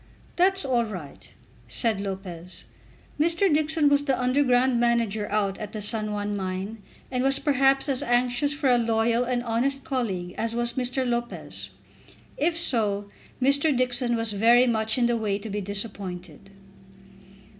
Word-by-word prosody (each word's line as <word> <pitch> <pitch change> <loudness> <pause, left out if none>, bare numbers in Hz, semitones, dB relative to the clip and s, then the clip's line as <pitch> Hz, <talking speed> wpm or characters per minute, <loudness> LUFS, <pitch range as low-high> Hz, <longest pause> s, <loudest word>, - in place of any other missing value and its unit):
"That's 385 -1 +2
all 245 -3 +2
right," 180 -10 -9 0.4
said 220 -5 -1
Lopez. 185 -3 -7 0.6
Mr. 340 +3 +2
Dixon 310 0 +2
was 285 0 +3
the 270 -3 0
underground 250 -1 +2
manager 230 -3 0
out 200 -2 -1
at 210 -1 -7
the 215 - -4
San 215 0 -1
Juan 205 0 -3
mine, 195 +3 -4 0.3
and 250 -1 -1
was 270 0 +4
perhaps 270 -1 +2
as 275 -1 +1
anxious 245 +3 +1
for 290 -1 -1
a 245 -1 +4
loyal 230 +1 +1
and 245 -1 -1
honest 250 +4 -1
colleague 190 -10 -3
as 230 +1 -1
was 240 0 -1
Mr. 255 0 -1
Lopez. 240 0 -4 0.7
If 330 +3 0
so, 210 -10 +1 0.3
Mr. 280 +2 +2
Dixon 245 -1 +1
was 225 -1 -1
very 235 +4 +5
much 220 -1 0
in 245 - +2
the 240 0 +1
way 210 -3 -1
to 210 +1 -7
be 205 +1 -2
disappointed. 195 -3 -5
235 Hz, 155 wpm, -25 LUFS, 205-265 Hz, 0.7 s, very